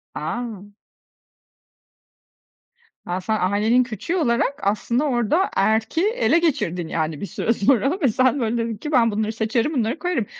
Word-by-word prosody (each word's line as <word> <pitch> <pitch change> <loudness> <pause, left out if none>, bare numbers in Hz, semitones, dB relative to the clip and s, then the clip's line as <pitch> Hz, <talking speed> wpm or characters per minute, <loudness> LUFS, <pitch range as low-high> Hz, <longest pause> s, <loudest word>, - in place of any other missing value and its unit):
A! 205 +4 -5 2.3
A, 180 +1 -3
sen 215 +3 -1
ailenin 210 +6 +2
küçüğü 240 - -4
olarak, 275 -1 0
aslında 235 +6 0
orada, 275 - +1
erki 220 - +1
ele 460 -8 +2
geçirdin 180 - -1
yani 155 -2 -3
bir - - -2
süre 215 +2 -1
sonra 275 - +1
ve 275 - +4
sen, 255 +4 +2
böyle, 235 -1 -1
dedin 230 -1 -2
ki: 300 +8 -6
Ben 235 -5 +4
bunları 215 +1 -1
seçerim, 230 +6 0
bunları 245 +3 -1
koyarım. 355 -11 -1
230 Hz, 145 wpm, -22 LUFS, 205-270 Hz, 2.3 s, ve